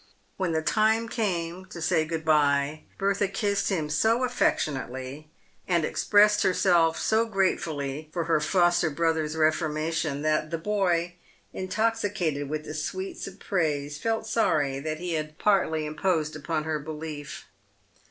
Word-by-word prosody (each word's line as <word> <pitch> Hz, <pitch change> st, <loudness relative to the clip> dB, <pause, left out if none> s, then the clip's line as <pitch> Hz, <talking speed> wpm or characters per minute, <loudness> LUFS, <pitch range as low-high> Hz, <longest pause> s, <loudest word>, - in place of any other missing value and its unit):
When 185 Hz, -3 st, -1 dB
the 160 Hz, -1 st, 0 dB
time 220 Hz, +4 st, +2 dB
came 185 Hz, -5 st, -2 dB
to 170 Hz, -, -9 dB
say 160 Hz, -1 st, +2 dB
good 160 Hz, 0 st, -4 dB
by, 145 Hz, -1 st, +2 dB
Bertha 200 Hz, 0 st, +1 dB
kissed 200 Hz, 0 st, 0 dB
him 165 Hz, -6 st, -1 dB
so 220 Hz, +11 st, +2 dB
affectionately, 140 Hz, -, -1 dB, 0.4 s
and 170 Hz, -4 st, +2 dB
expressed 210 Hz, +3 st, +4 dB
herself 170 Hz, -3 st, +3 dB
so 225 Hz, +1 st, +2 dB
gratefully 155 Hz, -7 st, -1 dB
for 170 Hz, 0 st, -1 dB
her 165 Hz, -1 st, +2 dB
foster 175 Hz, 0 st, +3 dB
brother's 160 Hz, 0 st, 0 dB
reforma 155 Hz, 0 st, +1 dB
tion, 150 Hz, -2 st, -2 dB
that 155 Hz, 0 st, +1 dB
the 165 Hz, -, -2 dB
boy, 175 Hz, -2 st, 0 dB, 0.4 s
intoxicated 190 Hz, -8 st, -1 dB
with 155 Hz, 0 st, -3 dB
the 150 Hz, -, -6 dB
sweets 185 Hz, +5 st, -4 dB
of 195 Hz, 0 st, -11 dB
praise, 150 Hz, -5 st, -1 dB
felt 225 Hz, +2 st, -1 dB
sorry 145 Hz, -12 st, +1 dB
he 175 Hz, +2 st, -4 dB
had 155 Hz, -1 st, -3 dB
partly 175 Hz, -7 st, +2 dB
imposed 155 Hz, 0 st, -1 dB
upon 155 Hz, +1 st, -2 dB
her 155 Hz, -1 st, -2 dB
belief. 150 Hz, 0 st, -7 dB
165 Hz, 140 wpm, -27 LUFS, 155-195 Hz, 0.4 s, expressed